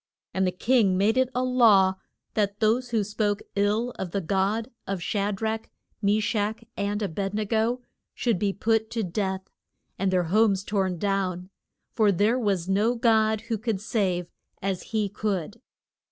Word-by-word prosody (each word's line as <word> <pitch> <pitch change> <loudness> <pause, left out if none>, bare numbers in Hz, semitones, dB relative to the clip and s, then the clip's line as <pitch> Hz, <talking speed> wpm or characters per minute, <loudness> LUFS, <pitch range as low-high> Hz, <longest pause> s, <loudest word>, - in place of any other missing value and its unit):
And 190 0 +1
the - - +1
king 200 -1 +2
made 210 +4 +3
it 260 -1 +3
a 250 - +1
law 225 -7 +5 0.4
that 205 -1 0
those 235 +3 +2
who 225 -3 +1
spoke 205 0 -1
ill 210 +4 +1
of 190 - -3
the 200 - -1
God 200 +6 0 0.2
of 195 -1 -2
Sha 200 +1 0
drach, 220 +2 -2 0.4
Me 205 +1 +3
shach, 215 +1 -1
and 205 +1 -1
A - - +1
bed 195 +4 -3
ne 215 0 0
go 230 +4 0 0.3
should 230 -7 0
be 200 0 +1
put 220 +2 0
to 230 -2 -2
death, 190 +1 -2 0.6
and 195 0 +1
their 185 -1 +2
homes 195 +2 +3
torn 190 -3 -1
down, 185 -1 -1 0.4
for 215 -3 +3
there 210 +7 +2
was 195 -6 0
no 210 +5 +2
God 220 -2 +3
who 225 -1 -3
could 220 -2 -1
save 195 -5 0 0.3
as 190 -2 -2
he 215 -2 0
could. 205 +1 -3
205 Hz, 170 wpm, -26 LUFS, 195-225 Hz, 0.6 s, law